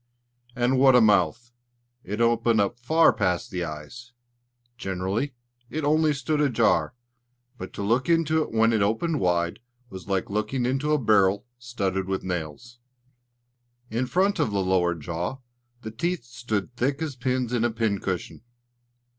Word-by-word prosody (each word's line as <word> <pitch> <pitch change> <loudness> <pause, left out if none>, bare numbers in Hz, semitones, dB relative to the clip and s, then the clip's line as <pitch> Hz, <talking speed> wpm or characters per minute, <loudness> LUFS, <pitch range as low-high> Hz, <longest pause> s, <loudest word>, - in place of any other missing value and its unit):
And 125 +1 +1
what 135 -1 +6
a - - +8
mouth! 110 +2 +2 0.5
It 105 +5 -4
opened 115 -1 +3
up 100 +3 0
far 160 +7 +4
past 90 -1 -1
the 90 -1 -2
eyes! 85 +11 -8 0.6
Generally, 95 +6 -3 0.3
it 155 +1 -4
only 155 +1 +3
stood 150 +2 -1
ajar; 115 - +2 0.6
but - - -7
to - - -5
look 120 +8 +1
into 160 -1 +3
it - - -4
when 115 +1 +3
it 110 - +2
opened 125 +10 0
wide 85 -1 0 0.3
was 95 0 -9
like 95 -2 -1
looking 105 +5 -1
into 135 +4 0
a 150 - +4
barrel 105 -4 +3
studded 100 -6 -2
with 95 -1 -2
nails. 90 +7 -5 1.1
In 120 +3 0
the - - -11
front 195 +3 +1
of - - +2
the 100 -2 0
lower 90 -2 +2
jaw, 85 - -4 0.5
the 110 - -6
teeth 170 +7 -2
stood 120 -2 -4
thick 135 +4 0
as 150 -4 -4
pins 125 -1 -1
in 120 -2 +1
a 120 - +2
pincushion. 100 -5 -2
115 Hz, 155 wpm, -25 LUFS, 95-130 Hz, 1.1 s, a